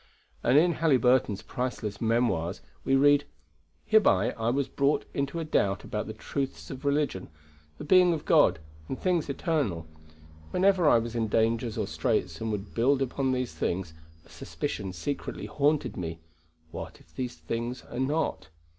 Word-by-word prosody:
And 125 +4 +4
in 170 +3 +5
Halyburton's 125 -8 +3
priceless 120 -5 -4
Memoirs 110 -7 +1 0.2
we 135 - +2
read: 145 +1 +5 0.6
"Hereby 115 - +4
I 115 0 -2
was 135 +2 0
brought 140 +2 +1
into 140 +4 -2
a - - -2
doubt 100 -10 +1
about - - -4
the - - -5
truths 135 -1 -4
of 130 - -8
religion, 140 - 0 0.5
the - - -7
being 180 +2 +5
of 160 -3 -3
God, 150 - +5 0.3
and 130 - -4
things 175 -5 0
eternal. 140 - -1 0.6
Whenever 185 - +3
I - - +6
was 115 0 -2
in 115 -2 0
dangers 115 +1 +1
or - - 0
straits - - -1
and 115 -1 -1
would 105 -1 -5
build 130 +4 +3
upon 135 +1 -1
these 125 -1 -2
things, 85 -2 -2 0.3
a - - -20
suspicion 95 - -5
secretly 95 +11 -4
haunted 150 +1 +1
me, 80 -3 -5 0.5
what - - -7
if - - -24
the 130 - -2
things 115 +8 -5
are - - -7
not? 145 - -1
125 Hz, 160 wpm, -28 LUFS, 110-145 Hz, 0.6 s, I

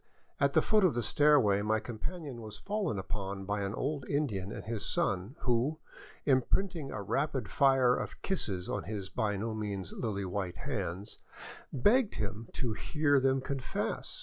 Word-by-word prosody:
At - - +3
the - - +5
foot 215 -2 +4
of 175 -10 +4
the 120 - 0
stairway 130 -7 +5
my 110 +1 +2
companion 125 +3 -5
was 110 -2 -7
fallen 200 - -1
upon 95 0 -4
by 105 +1 -1
an 100 +2 -2
old 140 +1 -1
Indian 105 -10 0
and - - -6
his 110 -1 -3
son 100 +7 0
who, 125 +5 +1 0.5
imprinting 150 +4 +2
a 105 -5 -4
rapid 135 +1 0
fire 135 -3 +5
of - - -4
kisses 100 - -1
on - - -2
his 100 -2 -4
by 105 -4 0
no 110 +3 -2
means 100 -4 -4
lily 100 -4 -2
white 90 -1 -3
hands, 100 -7 -4 0.5
begged 210 - +3
him 105 +2 -4
to 120 -4 -1
hear 145 +4 +2
them 135 0 +2
confess. 135 -1 -3
115 Hz, 165 wpm, -32 LUFS, 100-140 Hz, 0.5 s, the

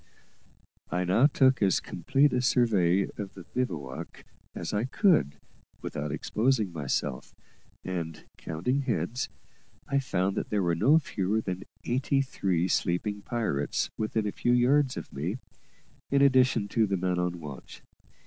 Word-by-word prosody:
I 90 +1 0
now 95 +10 +4
took 130 -4 +3
as 95 -3 +3
complete 140 +1 +1
a 125 - +2
survey 105 -8 +3 0.2
of 100 -2 -6
the 95 - -9
bivouac 85 - -5 0.3
as - - -4
I 105 +3 +1
could 155 - +2 0.5
without 75 0 -4
exposing 110 - 0
myself, 70 -3 -3 0.5
and, 85 -4 -5
counting 125 - -2
heads, 120 - -2 0.6
I 140 0 +2
found 95 -7 -1
that - - -2
there 105 -2 +1
were 85 -1 +2
no 125 - +5
fewer 105 - -1
than 95 -2 -4 0.2
eighty 135 +2 +1
three 95 -9 0
sleeping 100 +4 0
pirates 105 - -1
within 110 0 -1
a 105 - -1
few 120 - +1
yards 130 +2 +3
of - - -7
me, 85 - -3 0.7
in 140 0 +4
addition 130 -6 +4
to 110 +1 +2
the 100 -1 0
man 90 0 0
on 90 -1 -1
watch. 75 -4 -10
105 Hz, 145 wpm, -28 LUFS, 85-130 Hz, 0.7 s, no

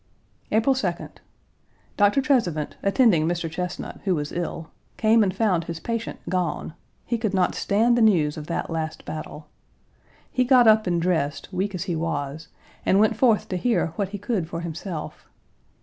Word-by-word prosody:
April 225 +5 +3
2d. 265 - -3 0.8
Dr. 205 +6 +4
Trezevant, 180 - +1
attending 200 - +3
Mr. 175 -1 -1
Chesnut, 180 +3 -5
who 190 -3 +2
was 150 -1 -3
ill, 170 -1 -4 0.3
came 225 0 +4
and 195 -3 +2
found 185 -5 +1
his 165 -1 -5
patient 230 +4 -4
gone; 180 -3 -2 0.3
he 235 -1 -1
could 215 -3 -1
not 185 - +2
stand 225 +4 +2
the 240 - +2
news 170 -9 +3
of 150 -1 -7
that 170 - -3
last 160 -1 -4
battle. 155 0 -7 0.9
He 255 - +2
got 250 -2 +5
up 215 -2 +5
and 175 -1 +1
dressed, 165 -5 -1
weak 190 +2 -1
as 175 - -3
he 175 -3 -2
was, 155 -1 -3 0.4
and 195 - +3
went 215 +1 +3
forth 225 -2 +3
to 185 - -1
hear 180 -5 0
what 200 -2 -2
he 205 - -5
could 195 -5 -2
for 170 -1 -4
himself. 170 0 -6
185 Hz, 170 wpm, -24 LUFS, 165-220 Hz, 0.9 s, got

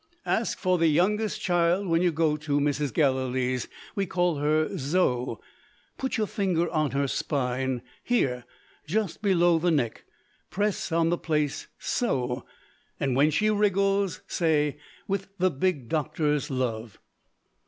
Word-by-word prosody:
Ask 225 - 0
for 185 -2 +1
the 165 - +4
youngest 200 +7 +1
child 175 +2 +2
when 165 0 +2
you 180 -1 +3
go 160 -1 +1
to 150 -1 -1
Mrs. 145 -1 0
Gallilee's. 130 -2 0 0.3
We 195 -1 -1
call 175 -3 +1
her 155 +2 +1
Zo. 135 -4 0 0.6
Put 265 -2 -1
your 215 - +1
finger 185 -5 0
on 155 -3 +1
her 140 +1 0
spine 130 -2 -1 0.2
here, 130 - +1 0.4
just 200 +1 -1
below 175 -4 +3
the 175 +2 +1
neck. 135 -9 0 0.4
Press 205 -2 -1
on 165 0 +2
the 175 - 0
place 150 -3 -1
so. 130 - -1 0.6
And, 135 -3 0
when 145 +3 +4
she 215 +8 +2
wriggles, 200 -2 +1
say, 150 -4 +1 0.3
With 195 0 -2
the 185 0 +2
big 145 -4 -1
doctor's 150 -1 0
love." 120 -5 -3
160 Hz, 140 wpm, -27 LUFS, 140-185 Hz, 0.6 s, the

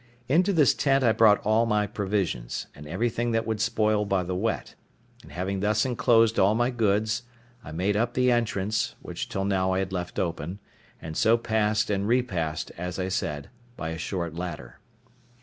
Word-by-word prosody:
Into 180 +8 +3
this 155 -8 +4
tent 135 -1 +2
I 115 - +5
brought 110 -2 +4
all 110 +2 +3
my 105 -1 +2
provisions, 95 - -2
and 75 - -11
everything 115 +7 -1
that 115 0 +1
would 110 -2 -2
spoil 110 -2 +2
by 95 -2 0
the 90 +1 -4
wet; 110 +5 -2 0.5
and - - -15
having 95 +2 -3
thus 105 +3 +1
enclosed 115 -3 +3
all 100 +3 +4
my 120 +2 +1
goods, 110 -1 +1 0.4
I - - -9
made 95 +6 0
up 120 +3 0
the 125 0 +3
entrance, 110 -3 0
which - - -5
till 95 0 -2
now 95 -1 +1
I - - 0
had 95 0 -2
left 90 -1 -4
open, 85 +1 -3 0.4
and 80 -1 -7
so 115 +6 +4
passed 110 -2 0
and 100 0 0
repassed, 90 -11 -1
as 90 0 -4
I 95 0 -2
said, 75 -6 -3 0.3
by 80 - -4
a 80 0 -5
short 85 -2 -3
ladder. 80 -8 -7
105 Hz, 185 wpm, -26 LUFS, 90-115 Hz, 0.5 s, I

